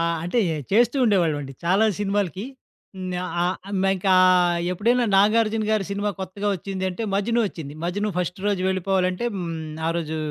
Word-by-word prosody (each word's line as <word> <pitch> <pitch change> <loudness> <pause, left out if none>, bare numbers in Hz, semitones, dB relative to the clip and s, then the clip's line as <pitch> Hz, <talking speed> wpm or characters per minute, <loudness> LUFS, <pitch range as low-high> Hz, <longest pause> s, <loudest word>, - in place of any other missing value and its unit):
ఆ! - - +2 0.2
అంటే 175 +8 0 0.3
చేస్తూ 235 +5 +4
ఉండేవాళ్లమండి. 160 - +1
చాలా 190 +6 +3 0.2
సినిమాలకి 200 -1 -1 0.5
హ్, - - -8 0.4
ఆహ్, 180 +1 0 0.4
ఇంకా 190 0 +2 0.6
ఎప్పుడైనా 240 +7 +2
నాగార్జున 215 +2 +3
గారి 215 -3 +1
సినిమా 205 +1 -1
కొత్తగా 200 +2 -3
వచ్చిందంటే, 190 +2 -4
'మజ్ను' 230 +4 +1
వచ్చింది. 155 -7 -7
'మజ్ను' 205 +4 -1
ఫస్ట్ 180 +2 -2
రోజు 200 -3 0
వెళ్లిపోవాలంటే 185 +2 0
హ్మ్. 170 -3 -4 0.3
ఆ - - +2
రోజు 160 -2 -3
195 Hz, 140 wpm, -23 LUFS, 180-210 Hz, 0.6 s, చేస్తూ